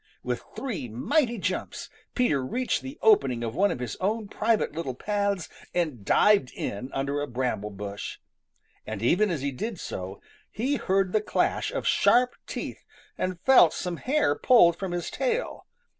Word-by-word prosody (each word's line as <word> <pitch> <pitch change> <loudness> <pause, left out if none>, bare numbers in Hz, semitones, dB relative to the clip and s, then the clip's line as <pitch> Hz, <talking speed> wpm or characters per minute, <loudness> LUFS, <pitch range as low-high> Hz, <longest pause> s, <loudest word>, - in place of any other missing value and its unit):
With - - -2
three 210 - -4
mighty 240 - +1
jumps, 190 - -3 0.3
Peter 195 - +2
reached 250 - -1
the 270 +2 -8
opening 130 - +4
of 115 -1 -3
one 200 +7 +3
of - - -2
his 125 -3 -4
own 210 +3 -1
private 220 -7 +1
little 140 -6 -3
paths 200 +1 -1 0.3
and 155 - -1
dived 200 - +4
in 115 +6 -4
under 140 +1 -1
a 145 - -2
bramble 120 -5 -2
bush. 100 0 -6 0.7
And 110 -1 -6
even 195 - +3
as 165 -6 -2
he 140 - 0
did 200 - -5
so, 95 +2 -6 0.3
he 265 +7 -1
heard 190 -3 +1
the 215 - +3
clash 210 - 0
of - - -3
sharp 250 +1 +4
teeth - - -6 0.3
and 185 -2 -3
felt 255 -12 +6
some 175 -1 -3
hair 265 - +1
pulled 170 -2 +5
from 190 -2 -4
his 175 0 -3
tail. - - -2
180 Hz, 165 wpm, -27 LUFS, -, 0.7 s, felt